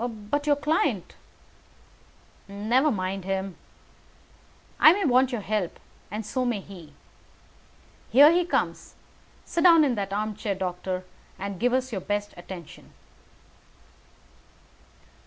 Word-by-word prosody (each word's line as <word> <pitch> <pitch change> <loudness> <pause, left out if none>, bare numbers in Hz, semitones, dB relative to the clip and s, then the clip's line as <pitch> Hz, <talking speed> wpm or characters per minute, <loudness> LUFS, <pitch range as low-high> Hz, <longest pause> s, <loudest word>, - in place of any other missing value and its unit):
"But 240 +5 -3
your 290 - +5
client 290 - -1 0.8
" - - -31 0.2
"Never 265 +5 +4
mind 190 -4 -3
him. 190 -1 -3 1.2
I 310 - +8
may 400 0 -1
want 260 -1 +3
your 240 -4 -3
help, 205 -4 -2 0.3
and 210 +2 -5
so 255 +4 -2
may 240 -4 -1
he. 180 -6 -12 1.2
Here 285 +5 +8
he 355 +1 +3
comes. 350 - -2 0.5
Sit 335 - -1
down 335 -3 +7
in 275 -4 +2
that 200 -3 -3
armchair, 210 0 -2
doctor, 185 0 -4 0.3
and 195 -1 -5
give 245 +3 +2
us 260 0 0
your 195 -4 -3
best 205 +1 -3
attention." 175 -2 -11
215 Hz, 120 wpm, -26 LUFS, 190-265 Hz, 1.2 s, I